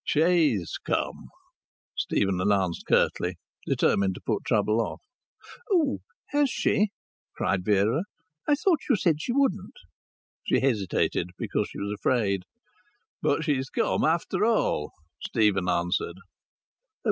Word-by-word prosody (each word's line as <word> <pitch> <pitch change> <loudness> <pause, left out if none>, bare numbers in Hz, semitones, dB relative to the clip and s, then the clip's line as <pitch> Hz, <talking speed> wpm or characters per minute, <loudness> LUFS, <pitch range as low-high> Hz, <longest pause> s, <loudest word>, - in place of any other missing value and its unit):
"She's 155 - +2
come," - - -2 0.7
Stephen 95 -2 0
announced 95 -3 0
curtly, 90 +1 +2 0.3
determined 95 -2 +2
to - - -10
put - - -1
trouble 110 +2 +2
off. - - -4 0.7
"Oh, 325 -7 +2 0.3
has 290 -1 +2
she?" 210 -3 +1 0.5
cried 95 -2 0
Vera. 105 - +2 0.4
"I 295 - +5
thought 330 +1 +2
you 255 - +5
said 165 -6 +1
she 240 - -2
wouldn't." 225 -8 0 0.7
"She - - +3
hesitated, 100 -8 0
because - - -1
she - - -10
was 100 +1 -3
afraid. 100 -4 0 0.8
But 145 +3 +1
she's 135 -4 0
come - - 0
after 170 +4 +1
all," 215 - +1 0.3
Stephen 100 -4 +1
answered. 90 0 0
115 Hz, 120 wpm, -27 LUFS, -, 0.8 s, I